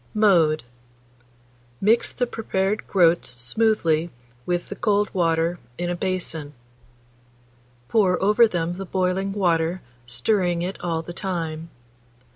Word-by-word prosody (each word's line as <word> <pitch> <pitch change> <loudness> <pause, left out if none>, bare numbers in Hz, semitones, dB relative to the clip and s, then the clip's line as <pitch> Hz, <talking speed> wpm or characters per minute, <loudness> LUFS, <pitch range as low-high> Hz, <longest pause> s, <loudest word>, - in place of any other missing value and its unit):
Mode. 170 -8 +4 1.2
Mix 220 +4 +3
the 250 - -1
prepared 210 -3 -2
groats 175 -3 +3
smoothly 165 - +1 0.4
with 175 0 -1
the - - -5
cold 205 -1 +1
water 165 -1 +1 0.2
in 175 0 -2
a - - -1
basin; 170 -5 -3 1.3
pour 185 - +2
over 210 +4 +5
them 175 -3 -2
the 195 - -5
boiling 185 +2 0
water, 175 -3 0 0.2
stirring 175 - +1
it 185 +2 -4
all 165 -2 -2
the 175 - -8
time. 165 -4 -4
180 Hz, 115 wpm, -23 LUFS, 165-195 Hz, 1.3 s, over